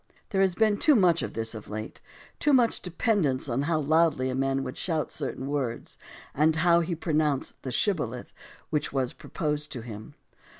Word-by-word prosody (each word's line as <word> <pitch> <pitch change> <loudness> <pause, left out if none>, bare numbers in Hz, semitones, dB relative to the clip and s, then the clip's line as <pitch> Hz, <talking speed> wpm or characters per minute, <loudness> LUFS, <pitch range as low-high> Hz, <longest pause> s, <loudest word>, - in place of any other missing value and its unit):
There 195 -2 +1
has 190 -2 +2
been 215 0 +2
too 300 - +5
much 175 -6 +4
of - - -4
this 115 0 -2
of 110 -2 -9
late, 110 +1 -6 0.4
too 295 - +3
much 245 -3 +3
dependence 175 - 0
on 125 +1 0
how 160 +2 +1
loudly 155 -3 +2
a - - -3
man 135 0 0
could 130 - -5
shout 160 -6 -2
certain 130 - -4
words 135 -5 -3 0.3
and 155 +2 +3
how 170 +1 +4
he 170 0 -1
pronounced 155 -4 -1
the 130 - -5
"Shibboleth" 125 - -1 0.4
which 150 -2 0
was 130 -2 -1
proposed 150 -1 -3
to 125 - -5
him. 110 -2 -9
150 Hz, 180 wpm, -27 LUFS, 130-170 Hz, 0.4 s, too